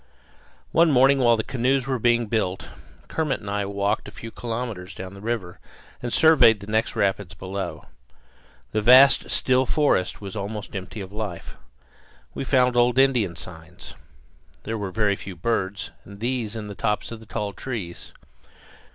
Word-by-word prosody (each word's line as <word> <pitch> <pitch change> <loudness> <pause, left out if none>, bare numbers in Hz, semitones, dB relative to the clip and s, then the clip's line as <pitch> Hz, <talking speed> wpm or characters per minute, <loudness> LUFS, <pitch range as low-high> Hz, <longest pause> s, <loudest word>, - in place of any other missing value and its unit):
One 170 0 +5
morning 135 0 +5
while 120 -2 +5
the 110 - -2
canoes 130 +2 0
were 130 -2 -1
being 120 0 +3
built 105 -4 -2 0.4
Kermit 155 -4 -1
and 105 - -7
I 100 0 -1
walked 100 0 -1
a - - -6
few 115 - -9
kilometres 115 -7 -5
down 95 0 -7
the 100 - -11
river 110 -6 -4 0.4
and 120 - -4
surveyed 125 -10 +6
the 100 - -9
next 110 +2 0
rapids 100 -2 -1
below. 95 +1 -5 0.9
The 110 - 0
vast 130 +5 +7
still 130 0 +2
forest 145 -12 +1
was 100 -1 -8
almost 105 +1 -5
empty 95 +2 -6
of 95 +1 -9
life. 105 -5 -5 0.8
We - - -4
found 125 -2 +3
old 120 +1 +3
Indian 125 -10 +3
signs. 80 0 -10 0.7
There 115 - -3
were 100 -3 -3
very 105 0 +1
few 100 -1 -9
birds, 100 +1 -2
and 100 0 -13
these 120 -2 -2
in 110 -2 -5
the 105 - -7
tops 105 +3 -2
of 115 - -7
the 110 - -15
tall 105 -3 -3
trees. 100 -6 -6
110 Hz, 165 wpm, -24 LUFS, 100-125 Hz, 0.9 s, vast